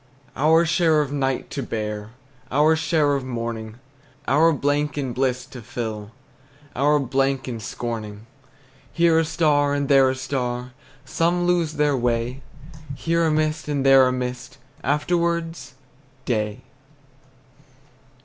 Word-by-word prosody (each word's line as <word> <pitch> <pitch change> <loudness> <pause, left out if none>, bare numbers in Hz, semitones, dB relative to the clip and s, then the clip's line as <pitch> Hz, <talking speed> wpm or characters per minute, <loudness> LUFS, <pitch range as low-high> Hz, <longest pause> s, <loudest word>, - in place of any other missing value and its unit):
Our 160 +4 +4
share 165 -2 +3
of 140 0 -6
night 135 -2 -2
to 140 - -3
bear, 105 -3 -4 0.4
Our 150 +4 +4
share 155 -2 +1
of 140 -2 -1
morning, 115 -3 -5 0.5
Our 160 +5 +4
blank 145 0 0
in 135 -4 -2
bliss 130 0 -1
to 125 -2 -11
fill, 110 -3 -5 0.7
Our 145 +3 +3
blank 135 0 0
in 120 -3 -4
scorning. 110 -1 -6 0.7
Here 170 -1 +3
a 165 - +1
star, 150 -3 +2
and 140 -1 -1
there 135 -2 +6
a 130 - -1
star, 125 -1 -3 0.3
Some 170 +5 0
lose 175 -3 +1
their 150 -2 +1
way. 120 +1 -1 0.5
Here 165 +4 0
a - - +1
mist, 155 0 0
and 140 -2 -1
there 135 -1 +7
a - - +1
mist, 125 +1 -5 0.3
Afterwards 165 -2 -1 0.5
day! 105 -3 -2
135 Hz, 130 wpm, -23 LUFS, 125-155 Hz, 0.7 s, there